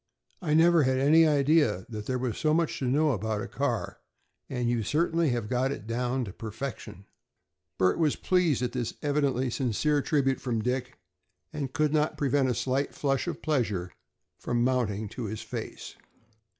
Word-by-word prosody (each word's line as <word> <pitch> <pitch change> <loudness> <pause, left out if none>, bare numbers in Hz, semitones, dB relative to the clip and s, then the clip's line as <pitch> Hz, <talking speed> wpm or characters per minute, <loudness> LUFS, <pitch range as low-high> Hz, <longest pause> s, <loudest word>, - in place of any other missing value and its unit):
I 155 -4 +1
never 165 +1 +6
had 130 -1 +2
any 155 +4 +5
idea 145 - +3
that 105 -2 -7
there 130 - 0
was 125 -3 -2
so 155 0 +1
much 165 -1 0
to 135 - -2
know 145 +4 +3
about 110 -2 -2
a - - -5
car, - - -2 0.5
and 125 -2 -2
you 120 -1 +1
certainly 165 +6 +1
have 120 -3 -1
got 130 +3 0
it 110 -7 -6
down 125 +2 -1
to 95 - -8
perfection." 110 -4 -7 0.7
Bert 90 - +2
was 155 -3 +2
pleased 175 -9 +1
at 125 - -1
this 120 -3 -3
evidently 140 -4 +1
sincere 140 +5 +1
tribute 135 -2 +1
from 120 -3 -1
Dick, 125 +2 -2 0.6
and 140 -4 -3
could 150 0 +1
not 155 0 +1
prevent 140 -1 +2
a 125 - 0
slight 130 +4 -1
flush 135 +2 0
of 175 - -5
pleasure 105 - -1 0.5
from 120 -1 0
mounting 115 -5 0
to 120 - -6
his 110 +1 -5
face. 110 - -7
130 Hz, 175 wpm, -28 LUFS, 115-150 Hz, 0.7 s, never